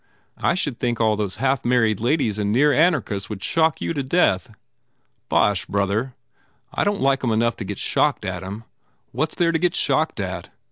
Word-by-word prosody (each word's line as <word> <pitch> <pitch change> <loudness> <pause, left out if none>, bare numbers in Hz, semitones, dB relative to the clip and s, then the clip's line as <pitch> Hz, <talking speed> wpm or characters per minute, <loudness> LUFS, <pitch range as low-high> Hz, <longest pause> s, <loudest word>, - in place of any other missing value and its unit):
"I 170 - +1
should 145 -9 -2
think 120 -2 -1
all 110 -2 +3
those 105 -3 -3
half 135 -1 0
married 115 -4 +2
ladies 120 -4 0
and 105 0 0
near 145 +6 +4
anarchists 135 - +1
would 105 -3 -6
shock 160 -1 +1
you - - -2
to 145 - -2
death." 130 - +2 0.8
"Bosh, 105 -3 +2
brother. 100 +6 -1 0.6
I - - 0
don 205 0 +1
t - - -7
like 135 -1 +2
em 120 - +1
enough 115 +1 +1
to - - -5
get 100 0 -5
shocked - - 0
at - - -3
em. 100 +4 -7 0.5
What 155 - -1
s - - -8
there 170 -2 +2
to 160 - 0
get 175 0 +1
shocked 155 -2 0
at? 95 -3 -4
120 Hz, 200 wpm, -22 LUFS, 105-150 Hz, 0.8 s, near